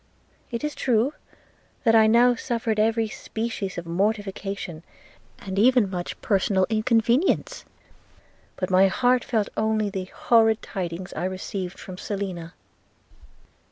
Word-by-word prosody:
– - - -36
It 235 +2 -4
is 300 0 -2
true, 245 +2 +1 0.7
that 225 -3 +4
I 220 -1 +6
now 240 +2 +5
suffered 230 -2 -2
every 225 +1 +2
species 220 -4 -5
of 175 - -5
mortification, 195 -2 -2 0.6
and 195 0 -4
even 240 -3 +4
much 175 -2 -5
personal 195 -2 +2
inconvenience; 235 - +1 0.9
but 185 0 -3
my 185 +1 +6
heart 245 +5 +2
felt 220 -4 0
only 215 -1 0
the 190 -1 -4
horrid 225 +2 +2
tidings 180 -1 -5
I - - -3
received 185 0 -4
from 185 -1 -9
Selina. 185 -5 -5
215 Hz, 125 wpm, -24 LUFS, 190-230 Hz, 0.9 s, I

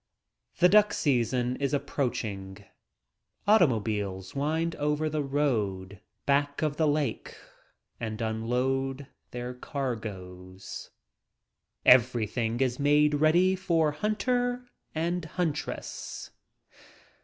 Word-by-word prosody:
The 180 - +6
duck 210 +2 +5
season 125 -2 +1
is 140 +1 0
approaching. 105 -8 -3 0.8
Auto 205 -5 +7
mobiles 105 -5 -3
wind 160 +4 -1
over 150 +1 0
the 155 0 0
road 105 -10 -1 0.2
back 145 +2 +1
of 150 -1 0
the 160 - +3
lake 145 -1 -1 0.6
and 110 -1 -4
unload 125 +5 -1 0.2
their 125 +1 -5
cargoes. 100 -8 -6 1.0
Everything 120 -1 +3
is 125 -1 +1
made 150 +1 +4
ready 175 +4 +4
for 170 -5 +1
hunter 245 - -1 0.3
and 170 +2 -1
huntress. 160 -2 -4
135 Hz, 95 wpm, -28 LUFS, 115-155 Hz, 1.0 s, Auto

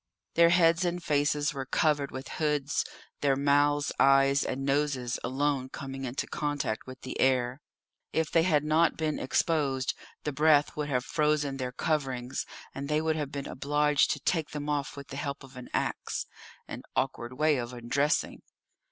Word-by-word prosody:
Their 170 0 +6
heads 170 0 +4
and 175 0 -1
faces 145 0 +1
were 135 -2 -5
covered 145 -1 +1
with 130 +1 -7
hoods, 150 -2 +1 0.4
their 140 -2 +2
mouths, 145 +1 +2
eyes, 135 0 +5
and 135 +1 -3
noses 140 -4 0
alone 130 +1 0
coming 135 0 -6
into 125 +1 -3
contact 145 -7 -2
with 130 0 -10
the 130 - -6
air. 130 0 +2 0.5
If 160 -1 0
they 165 - +5
had 155 -4 +3
not 155 +2 +3
been 155 -1 -1
exposed 135 -2 +1 0.3
the 150 - -1
breath 150 0 +4
would 150 -1 -3
have 125 -2 0
frozen 150 -3 +1
their 125 -1 -3
coverings, 130 -3 -2 0.3
and 140 +1 -5
they 150 0 +2
would 160 0 0
have 145 -3 -3
been 140 -1 -5
obliged 145 +1 +2
to 150 - -6
take 160 +2 0
them 150 0 -5
off 145 -1 -2
with 140 - -9
the 135 - -6
help 140 -1 -4
of 135 -1 -14
an 125 -1 -9
axe - - -2 0.4
an - - -6
awkward 130 -2 -1
way 155 -1 +3
of 120 -1 -4
undressing. 125 +5 0
145 Hz, 170 wpm, -29 LUFS, 135-150 Hz, 0.5 s, Their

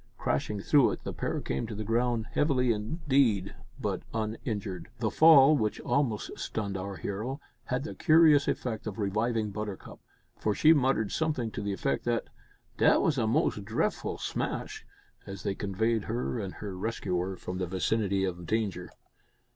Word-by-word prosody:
Crashing 100 +9 -1
through 140 +5 +4
it - - -5
the - - -4
pair - - -2
came 65 +11 -3
to 110 - -6
the 110 - -4
ground, 115 +1 0
heavily 130 -5 +2
indeed, 115 - +1 0.3
but - - -2
uninjured! 110 -4 -3
The - - -1
fall, 155 -2 +7
which 110 -6 -1
almost 125 -7 -1
stunned 100 -3 -3
our 95 +1 -4
hero, 110 +9 -4 0.3
had 125 +1 -2
the 155 - -5
curious 155 -3 +5
effect 115 -2 -2
of 105 - -5
reviving 110 +1 0
Buttercup, 105 -1 -6 0.4
for 105 -1 0
she 160 +1 +6
muttered 130 -8 +1
something 150 -8 -1
to - - -5
the 100 -1 -2
effect 135 +8 -1
that, 120 -1 -1 0.5
"dat - - +5
was 145 -4 +2
a 110 - +1
mos' 125 -1 +1
drefful 110 +3 -2
smash," - - -4 0.4
as 100 -2 -7
they 100 - 0
conveyed 105 +3 -1
her 120 +1 -2
and 95 -3 -5
her 100 -3 -6
rescuer 95 -3 -2
from 90 +1 -5
the 90 - -1
vicinity 95 +2 0
of 90 -2 -3
danger. 100 -5 -1
110 Hz, 165 wpm, -29 LUFS, 100-125 Hz, 0.5 s, fall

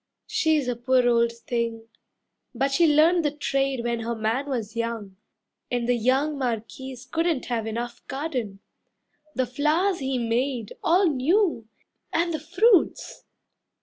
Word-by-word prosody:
She's 310 -4 +1
a 245 - 0
poor 250 +1 +2
old 235 -1 +3
thing, 230 -1 -3 0.7
but 270 +3 +1
she 330 +4 +4
learnt 320 +4 +5
the 300 - +1
trade 275 -3 -1
When 235 -1 -1
her 230 +1 -3
man 225 +6 -1
was 230 -4 -3
young, 230 -4 -4 0.5
and 240 -1 -1
the 245 - +3
young 265 +5 +1
Marquis 250 +1 -4
Couldn't 330 -4 0
have 230 -3 -2
enough 235 +2 -4
garden. 255 -9 -4 0.7
The 255 - +1
flowers 310 +9 +1
he 265 -1 -1
made 235 0 -1
All 360 +4 +4
new! 310 - +1 0.4
And 340 0 0
the 315 - -2
fruits! 365 +6 +2
255 Hz, 140 wpm, -25 LUFS, 235-305 Hz, 0.7 s, learnt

